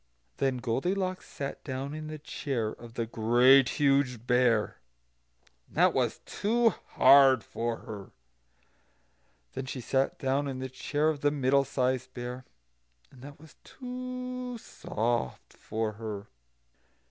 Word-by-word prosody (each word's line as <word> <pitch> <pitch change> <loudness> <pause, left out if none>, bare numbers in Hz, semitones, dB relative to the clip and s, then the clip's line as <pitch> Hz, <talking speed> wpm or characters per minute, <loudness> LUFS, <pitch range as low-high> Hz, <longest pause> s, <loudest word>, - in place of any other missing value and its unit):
Then 135 -2 +1
Goldilocks 185 +11 -2
sat 140 -1 -6
down 135 +1 -4
in 155 0 -6
the 155 0 -6
chair 135 -6 -3
of 115 0 -12
the 115 - -1
Great 120 +4 +5
Huge 135 -5 +2
Bear, 120 -3 +2 0.9
and - - -16
that - - +5
was - - 0
too 230 +3 +2 0.2
hard 135 -4 +7
for 115 0 -3
her. 105 -2 -7
And - - -22 1.4
then 135 - -4
she 130 - -5
sat 135 +2 0
down 135 +2 0
in 135 -2 -4
the 130 0 -4
chair 145 +4 0
of 155 -2 -2
the 145 - +4
Middle 140 -1 +2
sized 130 -1 -1
Bear, 125 +1 -6 0.7
and 125 - -16
that 140 +1 -11
was 160 +1 -17
too 250 -1 -6
soft 115 - -3
for 110 0 -3
her. 105 -2 -6
130 Hz, 135 wpm, -29 LUFS, 120-145 Hz, 1.4 s, hard